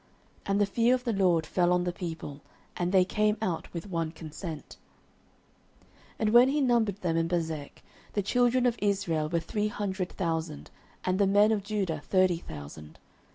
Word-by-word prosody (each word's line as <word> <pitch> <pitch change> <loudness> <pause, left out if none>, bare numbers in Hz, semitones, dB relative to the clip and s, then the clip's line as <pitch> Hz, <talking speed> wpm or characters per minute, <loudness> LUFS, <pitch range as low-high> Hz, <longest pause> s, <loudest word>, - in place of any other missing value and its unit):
And 200 0 +1
the 205 - +4
fear 230 +5 +3
of 250 - -5
the 235 -3 -1
LORD 180 -5 +2
fell 175 +1 +1
on 180 0 +2
the 180 - -1
people, 160 -5 -6 0.3
and 175 0 -1
they 190 -1 +5
came 210 +2 +1
out 185 -7 -3
with 170 +3 -6
one 165 -4 -2
consent. 160 0 -8 1.4
09:011:008 - - -33
And 215 - +1
when 240 +3 +7
he 295 +2 +1
numbered 235 -7 +1
them 165 -2 0
in 165 0 +1
Bezek, 160 -4 -3 0.3
the 205 - 0
children 245 +4 +2
of 240 -1 +1
Israel 180 -7 0
were 170 - +1
three 210 +5 -2
hundred 190 -3 -3
thousand, 160 -4 -3 0.3
and 185 +1 +1
the 200 - +4
men 205 +2 +5
of 215 -2 +1
Judah 195 -6 -2
thirty 185 0 +3
thousand. 75 - -10
185 Hz, 180 wpm, -28 LUFS, 165-210 Hz, 1.4 s, when